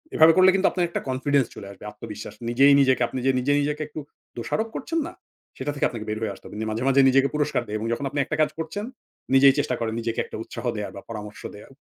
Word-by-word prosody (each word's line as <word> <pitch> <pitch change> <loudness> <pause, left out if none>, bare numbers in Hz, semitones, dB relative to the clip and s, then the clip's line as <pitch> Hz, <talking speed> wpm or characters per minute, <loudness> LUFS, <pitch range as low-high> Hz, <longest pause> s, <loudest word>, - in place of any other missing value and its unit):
এভাবে 160 +1 +7
করলে 185 0 +7
কিন্তু 195 0 +3
আপনার 175 -2 0
একটা - - -3
কনফিডেন্স 135 +1 +2
চলে 100 - -9
আসবে 100 - -14
আত্মবিশ্বাস। 105 0 -9
নিজেই 135 +4 +6
নিজেকে 130 -2 +3
আপনি 130 - -4
যে 135 - +5
নিজে 140 +3 +1
নিজেকে 150 +1 -2
একটু 155 - -7 0.4
দোষারোপ 220 - -1
করছেন 330 +4 -2
না? - - -13 0.4
সেটা 145 +2 -2
থেকে 140 - +2
আপনাকে 115 -3 -7
বের 110 0 -2
হয়ে 110 -3 -2
আসতে - - -19
হবে। - - -10 0.2
মাঝে, 110 +3 -2
মাঝে 135 0 +5
নিজেকে 135 +1 +4
পুরস্কার 150 -4 +1
দেয় 105 +1 -2
এবং 115 - -3
যখন 140 - -3
আপনি 145 - -3
একটা 150 +3 -2
কাজ 155 - +3
করছেন 205 +7 -4 0.5
নিজেই 135 0 +7
চেষ্টা 140 -3 0
করেন 115 -1 -2
নিজেকে 115 0 -2
একটা - - -8
উৎসাহ - - -8
দেয়ার 105 -1 -4
বা 100 - -8
পরামর্শ 105 -2 -7
দেওয়ার 105 - -13
135 Hz, 240 wpm, -24 LUFS, 115-150 Hz, 0.5 s, এভাবে